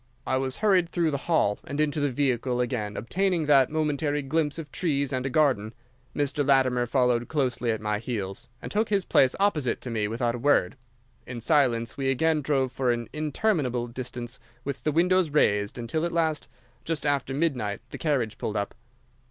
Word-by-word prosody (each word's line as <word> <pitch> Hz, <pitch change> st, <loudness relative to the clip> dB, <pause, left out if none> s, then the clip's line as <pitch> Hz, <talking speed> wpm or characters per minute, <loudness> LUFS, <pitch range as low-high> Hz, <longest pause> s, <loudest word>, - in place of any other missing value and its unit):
"I 130 Hz, -, +1 dB
was 130 Hz, 0 st, -2 dB
hurried 185 Hz, -5 st, +4 dB
through 170 Hz, -3 st, +1 dB
the 140 Hz, +2 st, -4 dB
hall 105 Hz, -11 st, +2 dB
and 145 Hz, -, -5 dB
into 150 Hz, 0 st, +1 dB
the 145 Hz, -1 st, +1 dB
vehicle, 125 Hz, -2 st, 0 dB
again 115 Hz, -4 st, -2 dB
obtaining 180 Hz, -, 0 dB
that 140 Hz, -3 st, +5 dB
momentary 150 Hz, -1 st, 0 dB
glimpse 150 Hz, +2 st, 0 dB
of 155 Hz, -4 st, -7 dB
trees 140 Hz, -6 st, -1 dB
and 130 Hz, +1 st, -1 dB
a -, -, -2 dB
garden. 125 Hz, -7 st, +1 dB, 0.4 s
Mr. 145 Hz, 0 st, 0 dB
Latimer 130 Hz, -3 st, +3 dB
followed 125 Hz, -2 st, +2 dB
closely 125 Hz, -5 st, -1 dB
at 110 Hz, -1 st, 0 dB
my 105 Hz, -1 st, -1 dB
heels, 105 Hz, -5 st, -5 dB
and -, -, -6 dB
took 215 Hz, +2 st, 0 dB
his 200 Hz, -3 st, +1 dB
place 130 Hz, -, +3 dB
opposite 160 Hz, -10 st, +1 dB
to 125 Hz, -, -6 dB
me 110 Hz, -2 st, 0 dB
without 120 Hz, +2 st, -1 dB
a 120 Hz, -, -5 dB
word. 145 Hz, +1 st, +2 dB, 0.5 s
In 125 Hz, -1 st, -6 dB
silence 120 Hz, -3 st, +1 dB
we 135 Hz, -1 st, 0 dB
again 155 Hz, +4 st, +2 dB
drove 135 Hz, -3 st, 0 dB
for 130 Hz, -1 st, -1 dB
an 120 Hz, -1 st, -3 dB
interminable 150 Hz, -, 0 dB
distance 120 Hz, -1 st, -7 dB, 0.2 s
with 135 Hz, -2 st, -5 dB
the 155 Hz, -, +2 dB
windows 180 Hz, +2 st, +3 dB
raised, 105 Hz, -9 st, +2 dB
until 120 Hz, +7 st, -2 dB
at 170 Hz, -, -1 dB
last, 160 Hz, -2 st, 0 dB, 0.4 s
just 160 Hz, -3 st, -3 dB
after 140 Hz, -2 st, 0 dB
midnight, 130 Hz, -10 st, -1 dB
the -, -, -7 dB
carriage 135 Hz, -9 st, -1 dB
pulled 110 Hz, -, -2 dB
up. 100 Hz, -1 st, -2 dB
135 Hz, 185 wpm, -26 LUFS, 120-155 Hz, 0.5 s, that